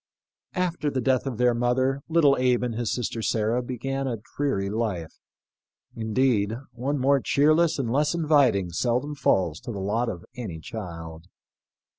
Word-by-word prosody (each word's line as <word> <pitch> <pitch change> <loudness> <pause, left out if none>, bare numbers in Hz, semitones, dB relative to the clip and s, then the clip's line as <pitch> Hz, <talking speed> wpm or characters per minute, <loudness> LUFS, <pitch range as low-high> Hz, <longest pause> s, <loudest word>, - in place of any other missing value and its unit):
After 175 -5 0
the 135 - -2
death 130 +1 +1
of 125 -5 -3
their 125 0 +3
mother 130 +3 +1
little 155 -4 +5
Abe 125 -1 +2
and 120 -2 -1
his 115 -2 -2
sister 120 -1 -2
Sarah 110 +2 +1
began 135 +2 -3
a 120 -3 -2 0.2
dreary 135 -9 0
life 100 -6 -3 0.4
— - - -68 0.3
indeed, 110 -1 +1 0.2
one 130 +5 -2
more 140 +1 +3
cheerless 155 +5 +3
and 125 -5 -2
less 150 +5 +2
inviting 140 - +3
seldom 125 - 0
falls 90 - +1
to - - -7
the 105 - -5
lot 110 +5 0
of 85 0 -6
any 105 -11 -6
child. 85 -4 -8
125 Hz, 160 wpm, -26 LUFS, 105-135 Hz, 0.4 s, little